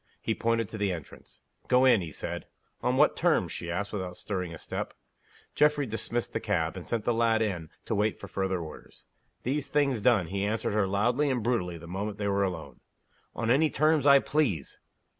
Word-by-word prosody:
He - - -1
pointed 115 -1 0
to 110 - -7
the 100 -2 +1
entrance. 80 -5 -9 0.2
"Go 125 +1 +5
in," 120 -6 +6
he 85 -3 -6
said. - - -5 0.3
"On 125 +1 +1
what 150 +2 +5
terms?" 155 - +2
she 85 - -5
asked, 100 +5 -3
without 90 -3 -4
stirring 90 -4 -3
a 80 - -7
step. - - -5 0.6
Geoffrey 150 -1 +3
dismissed 115 +1 -3
the - - 0
cab; 85 -6 -1
and 90 - -8
sent 115 -3 -1
the 120 - +2
lad 115 -1 +3
in, 90 -7 -3 0.2
to - - -2
wait 105 0 +1
for 100 - -8
further 95 -1 -1
orders. 80 -2 -10 0.4
These 145 +3 -1
things 140 -6 +1
done, 110 -5 +4
he 100 0 -2
answered 105 +1 -1
her 105 -2 +2
loudly 120 +9 +2
and 125 -4 0
brutally 90 -8 0
the 85 - -11
moment 100 +4 -4
they 100 -1 -2
were 100 0 +1
alone: 80 -9 -4 0.6
"On 115 0 0
any 155 +5 +4
terms 155 -1 +3
I 140 0 +9
please." 135 - 0
105 Hz, 200 wpm, -29 LUFS, 95-125 Hz, 0.6 s, I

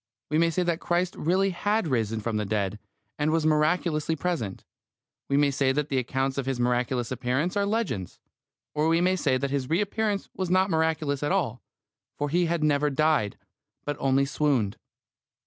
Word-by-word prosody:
We 155 - +3
may 165 0 +4
say 180 +2 0
that 170 -1 0
Christ 175 +1 0
really 190 +4 +1
had 205 +2 0
risen 115 -5 0
from 110 0 -2
the 105 - 0
dead, 105 -1 -1 0.4
and 150 +1 +2
was 160 0 +1
miraculously 155 0 +2
present; 155 - -3 0.6
we 140 - +2
may 145 -1 +4
say 135 -1 +2
that 150 +2 -1
the 135 - +1
accounts 135 +2 -1
of 135 - -3
His 135 -2 -1
miraculous 120 0 0
appearance 130 +8 -1
are 200 0 +1
legends; 195 - -2 0.5
or 150 +1 +1
we 165 +1 +3
may 185 +2 +3
say 130 -7 +1
that 135 +1 -2
His 135 -2 -1
reappearance 205 +4 0
was 185 -2 -2
not 185 +1 +3
miraculous 160 -3 0
at 145 - 0
all, 140 -11 0 0.6
for 145 0 -1
He 175 +3 +2
had 165 -1 0
never 150 -1 +2
died, 145 -7 +1 0.5
but 145 - -2
only 135 0 +2
swooned. 140 -8 +1
150 Hz, 180 wpm, -27 LUFS, 130-170 Hz, 0.6 s, may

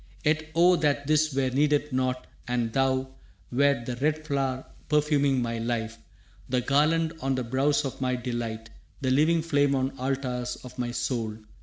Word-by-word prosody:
«Yet 155 +1 +1
oh 175 +1 +5
that 145 -2 +1
this 155 +1 +2
were 135 -1 0
needed 145 +1 +1
not, 130 0 0 0.2
and 120 -2 -1
thou 130 0 +1 0.4
Wert 135 -1 +2
the 125 - -3
red 155 +3 0
flower 135 -3 -1 0.2
perfuming 145 -3 +2
my 115 -1 -2
life, 115 -1 -3 0.5
The 125 0 +1
garland 155 +5 +2
on 135 0 0
the 130 - -1
brows 135 +5 +1
of 135 - -5
my 125 -1 +1
delight, 115 -2 -4 0.3
The 130 -1 +1
living 155 +4 +3
flame 145 -3 +2
on 135 +1 -1
altars 125 -2 -2
of 125 0 -11
my 120 -1 -1
soul! 120 -2 -2
135 Hz, 165 wpm, -27 LUFS, 125-145 Hz, 0.5 s, oh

